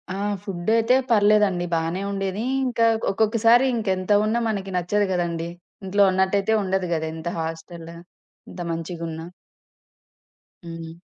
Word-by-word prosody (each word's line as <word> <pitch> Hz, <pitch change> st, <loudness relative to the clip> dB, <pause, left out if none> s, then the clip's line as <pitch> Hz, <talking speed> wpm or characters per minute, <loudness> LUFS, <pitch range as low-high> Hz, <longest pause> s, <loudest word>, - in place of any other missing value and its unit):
ఆ! -, -, -4 dB, 0.3 s
ఫుడ్ 185 Hz, -1 st, -4 dB
అయితే 230 Hz, +2 st, +3 dB
పర్లేదండి! 205 Hz, -4 st, +3 dB
బానే 165 Hz, +3 st, -1 dB
ఉండేది. 195 Hz, +1 st, -2 dB, 0.2 s
ఇంకా 235 Hz, -2 st, +1 dB, 0.3 s
ఒక్కొక్కసారి 230 Hz, +4 st, +4 dB
ఇంకా 220 Hz, -4 st, -2 dB
ఎంత 185 Hz, +2 st, -3 dB
ఉన్నా 225 Hz, +2 st, +1 dB
మనకి 195 Hz, -2 st, -3 dB
నచ్చదు 205 Hz, +4 st, +1 dB
కదండీ! 170 Hz, -2 st, -2 dB, 0.4 s
ఇంట్లో 200 Hz, +2 st, +3 dB
ఉన్నట్టయితే 190 Hz, +3 st, +1 dB
ఉండదు 190 Hz, -1 st, -1 dB
గదా! 160 Hz, -1 st, -1 dB
ఎంత 160 Hz, +1 st, -7 dB
హాస్టల్, 165 Hz, +1 st, -6 dB, 0.6 s
ఇంత 180 Hz, -, -8 dB
మంచిగున్నా. 165 Hz, 0 st, -5 dB, 1.4 s
హ్మ్. 165 Hz, -1 st, -8 dB
190 Hz, 125 wpm, -23 LUFS, 165-210 Hz, 1.4 s, ఒక్కొక్కసారి